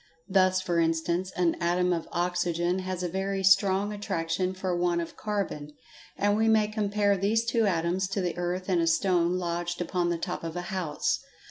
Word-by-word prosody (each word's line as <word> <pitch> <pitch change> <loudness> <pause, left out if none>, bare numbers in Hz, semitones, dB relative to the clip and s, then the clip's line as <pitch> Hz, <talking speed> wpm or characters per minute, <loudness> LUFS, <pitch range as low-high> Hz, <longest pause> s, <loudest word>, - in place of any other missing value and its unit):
Thus, 185 -1 +3
for 175 -2 0
instance, 165 +3 0
an 175 -2 +2
atom 180 +1 +2
of 165 -2 -3
oxygen 175 0 0
has 185 -1 -4
a - - 0
very 195 +2 -2
strong 195 +1 +4
attraction 185 -2 -2
for 185 -1 -2
one 175 0 +1
of 170 -1 -5
carbon, 195 -8 -3 0.4
and 205 0 +2
we 220 +1 +2
may 215 -1 +4
compare 205 -1 +1
these 210 +4 +1
two 230 -2 +2
atoms 180 +1 0
to 195 +1 -2
the 180 -2 -2
earth 180 +1 -3
and 180 -3 +2
a 165 - +1
stone 175 0 +2
lodged 175 0 -3
upon 175 0 -1
the 170 - 0
top 165 - -4
of 165 0 -5
a 175 - -2
house. 170 -6 -1
180 Hz, 190 wpm, -28 LUFS, 170-195 Hz, 0.4 s, strong